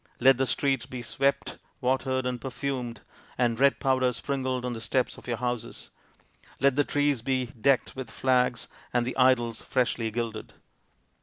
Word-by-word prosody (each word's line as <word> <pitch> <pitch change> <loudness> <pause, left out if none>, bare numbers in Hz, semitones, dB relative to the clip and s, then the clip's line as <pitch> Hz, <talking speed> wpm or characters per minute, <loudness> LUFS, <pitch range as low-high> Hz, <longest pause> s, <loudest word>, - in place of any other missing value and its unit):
Let 130 +1 +6
the 135 0 +1
streets 135 -2 0
be 125 -1 -6
swept, 140 +4 0 0.2
watered, 130 0 0
and 125 -1 -2
perfumed, 130 -4 -4 0.4
and 120 -2 +1
red 140 0 +4
powder 130 -1 +2
sprinkled 130 -1 -2
on 125 - -2
the 115 - -6
steps 125 +2 0
of - - -16
your 120 -2 -1
houses. 120 -1 -4 0.7
Let 135 -1 +3
the 145 - +3
trees 145 -3 +1
be 130 +1 0
decked 125 +2 +1
with 130 -3 -6
flags 125 -1 +1 0.2
and 120 -1 +1
the 125 - -3
idols 120 -3 +3
freshly 120 -3 0
gilded." 115 -1 -4
125 Hz, 160 wpm, -27 LUFS, 120-135 Hz, 0.7 s, Let